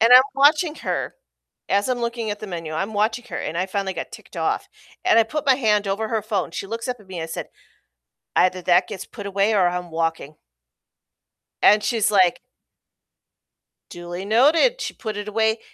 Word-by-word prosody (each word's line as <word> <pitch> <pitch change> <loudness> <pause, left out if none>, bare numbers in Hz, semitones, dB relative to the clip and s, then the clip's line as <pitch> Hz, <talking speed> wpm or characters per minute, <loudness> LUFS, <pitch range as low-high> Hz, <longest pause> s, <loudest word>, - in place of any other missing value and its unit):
And 230 +2 +5
I'm 255 +1 +11
watching 300 +3 +4
her - - -3 0.5
as 200 +5 +1
I'm 250 -1 0
looking 235 -2 -2
at 205 - -5
the 215 - -6
menu, 165 -4 -6
I'm 195 +7 -2
watching 220 +3 0
her, - - -4
and 165 - -4
I 185 - 0
finally 195 -1 -3
got - - -6
ticked - - -13
off, - - -1 0.4
and 370 - +5
I 230 - +7
put 300 +5 -4
my 265 - +6
hand 210 -5 +1
over 215 +3 -1
her 220 -3 -1
phone. 200 -5 -2
She 195 - -5
looks 230 +4 -5
up 250 - -2
at 205 - -18
me 185 - -7
and 160 - -3
I - - -5
said, 160 - -6 0.9
"Either 185 0 +3
that 180 0 +4
gets 195 -3 -7
put 205 -4 -10
away 200 +2 +1
or 185 -3 +4
I'm 180 -1 -3
walking." 165 -2 -2 1.3
And 210 0 +6
she's 220 -1 +1
like 185 -4 +4 1.5
"Duly 175 +2 -7
noted." 310 - +4
She - - -4
put 215 -2 -5
it 205 0 -5
away. 220 +1 +1
210 Hz, 200 wpm, -22 LUFS, 185-230 Hz, 1.5 s, I'm